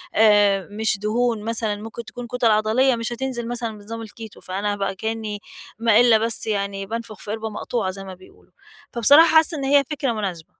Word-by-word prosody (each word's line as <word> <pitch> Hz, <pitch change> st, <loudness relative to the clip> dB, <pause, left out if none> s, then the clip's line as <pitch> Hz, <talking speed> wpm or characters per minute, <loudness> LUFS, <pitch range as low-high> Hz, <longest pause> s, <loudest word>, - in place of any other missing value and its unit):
آآ، 205 Hz, -3 st, +4 dB
مش 220 Hz, 0 st, 0 dB
دهون 225 Hz, +1 st, 0 dB
مثلًا 225 Hz, -2 st, -2 dB
ممكن 225 Hz, +2 st, -8 dB
تكون 245 Hz, +2 st, -8 dB
كُتَل 240 Hz, -2 st, +1 dB
عضليّة 225 Hz, +5 st, +3 dB
مش 230 Hz, +1 st, -4 dB
هتنزل 240 Hz, -1 st, -4 dB
مثلًا 235 Hz, -2 st, -4 dB
بنظام 225 Hz, +2 st, -8 dB
الكيتو 220 Hz, 0 st, -11 dB
فأنا 200 Hz, +2 st, -2 dB
بقى 195 Hz, -1 st, -2 dB
كأنّي 220 Hz, -1 st, -4 dB, 0.4 s
ما 230 Hz, -2 st, +4 dB
إلّا 235 Hz, -2 st, +6 dB
بس 225 Hz, 0 st, -2 dB
يعني 200 Hz, -2 st, -2 dB
بانفُخ 225 Hz, -1 st, -6 dB
في 205 Hz, -, -7 dB
قِربة 220 Hz, 0 st, -4 dB
مقطوعة 215 Hz, -1 st, -3 dB
زي 195 Hz, +1 st, -9 dB
ما 190 Hz, -, -8 dB
بيقولوا. 185 Hz, +1 st, -19 dB, 0.4 s
فبصراحة 285 Hz, +8 st, +6 dB
حاسّة 315 Hz, 0 st, +4 dB
إن 275 Hz, -, -4 dB
هي 280 Hz, +1 st, +4 dB
فكرة 275 Hz, -4 st, -1 dB
مناسبة. 190 Hz, -7 st, -4 dB
220 Hz, 185 wpm, -22 LUFS, 205-235 Hz, 0.4 s, إلّا